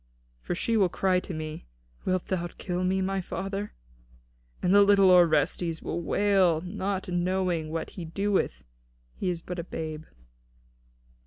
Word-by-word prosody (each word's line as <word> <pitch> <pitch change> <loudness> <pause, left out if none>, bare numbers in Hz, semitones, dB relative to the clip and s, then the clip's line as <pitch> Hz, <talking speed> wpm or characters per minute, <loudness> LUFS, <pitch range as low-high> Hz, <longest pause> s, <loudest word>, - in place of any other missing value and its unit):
For 175 - -3
she 225 +5 0
will 195 -4 +4
cry 185 0 +2
to 185 - -8
me, 155 - -6 0.4
'Wilt 185 -1 0
thou 175 -2 -2
kill 180 -1 -2
me, 190 +1 +1
my 195 0 -1
father?' 195 +3 -4 0.9
And 180 - +2
the 205 - +8
little 200 -2 +6
Orestes 170 -1 +3
will 170 - -3
wail, 190 -2 +3
not 195 +1 -3
knowing 180 -2 0
what 165 +1 -4
he 175 - -7
doeth, 180 - -1
seeing - - -33 0.5
he 185 - 0
is 170 -2 -3
but 180 0 -5
a - - -2
babe." 155 -2 -6
180 Hz, 155 wpm, -27 LUFS, 170-195 Hz, 0.9 s, the